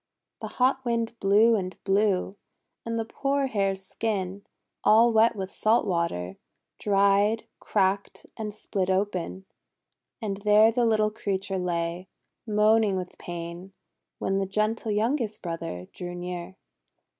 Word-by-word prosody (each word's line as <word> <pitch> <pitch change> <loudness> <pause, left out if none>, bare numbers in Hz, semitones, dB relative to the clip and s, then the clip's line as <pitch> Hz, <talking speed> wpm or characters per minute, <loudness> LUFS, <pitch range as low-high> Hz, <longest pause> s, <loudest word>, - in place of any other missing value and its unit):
The - - -4
hot 260 +1 +2
Wind 230 -2 -1
blew 210 +4 +5
and 185 -3 -3
blew, 195 -1 +1 0.5
and 230 0 -3
the 225 - -1
poor 275 +4 -1
Hare's 195 -5 -1
skin, 195 -2 -3 0.4
all 230 +2 +6
wet 225 +1 +4
with 190 -2 -5
salt 225 +2 +2
water, 170 - -2 0.4
dried, 200 +2 +3
cracked, 195 -1 -1
and 215 -2 -4
split 200 -2 -3
open. 190 -1 -1 0.7
And 205 -5 -3
there 210 +2 +5
the 235 0 +2
little 215 -1 +2
creature 195 -2 -2
lay, 175 0 -2 0.4
moaning 215 -1 +3
with 180 -1 -6
pain, 175 +2 -7 0.4
when 195 0 0
the 195 - -1
gentle 215 +3 -1
youngest 220 +1 -1
brother 165 - -5
drew 175 0 -6
near. 175 +1 -6
200 Hz, 130 wpm, -26 LUFS, 185-220 Hz, 0.7 s, all